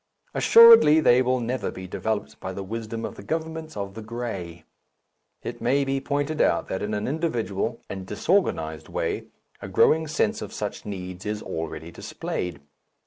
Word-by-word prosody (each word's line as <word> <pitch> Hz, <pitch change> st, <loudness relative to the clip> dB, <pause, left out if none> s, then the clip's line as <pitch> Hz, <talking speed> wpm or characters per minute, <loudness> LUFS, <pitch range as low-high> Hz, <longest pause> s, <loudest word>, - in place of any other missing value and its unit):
Assuredly 460 Hz, -, +8 dB
they 125 Hz, -5 st, +5 dB
will 130 Hz, 0 st, +1 dB
never 120 Hz, 0 st, -2 dB
be 95 Hz, -, -8 dB
developed 110 Hz, +3 st, -3 dB
by 95 Hz, 0 st, -5 dB
the 100 Hz, -, -5 dB
wisdom 115 Hz, +2 st, -5 dB
of -, -, -5 dB
the -, -, -11 dB
governments 160 Hz, -1 st, -4 dB
of 100 Hz, -1 st, -4 dB
the 110 Hz, -, -8 dB
grey. 105 Hz, -8 st, -6 dB, 0.8 s
It -, -, -6 dB
may 135 Hz, +3 st, +2 dB
be 135 Hz, 0 st, -1 dB
pointed 145 Hz, +3 st, -1 dB
out 85 Hz, -, +2 dB
that 95 Hz, -, -2 dB
in 105 Hz, +1 st, -2 dB
an 105 Hz, -, -2 dB
individual 120 Hz, -, -2 dB
and 95 Hz, -1 st, -6 dB
disorganized 95 Hz, -, 0 dB
way -, -, -2 dB, 0.4 s
a -, -, -6 dB
growing 160 Hz, 0 st, +3 dB
sense 155 Hz, -, 0 dB
of -, -, -7 dB
such -, -, -5 dB
needs 90 Hz, -2 st, -6 dB
is 105 Hz, 0 st, -3 dB
already 80 Hz, 0 st, -5 dB
displayed. 90 Hz, 0 st, -5 dB
115 Hz, 165 wpm, -25 LUFS, 95-140 Hz, 0.8 s, Assuredly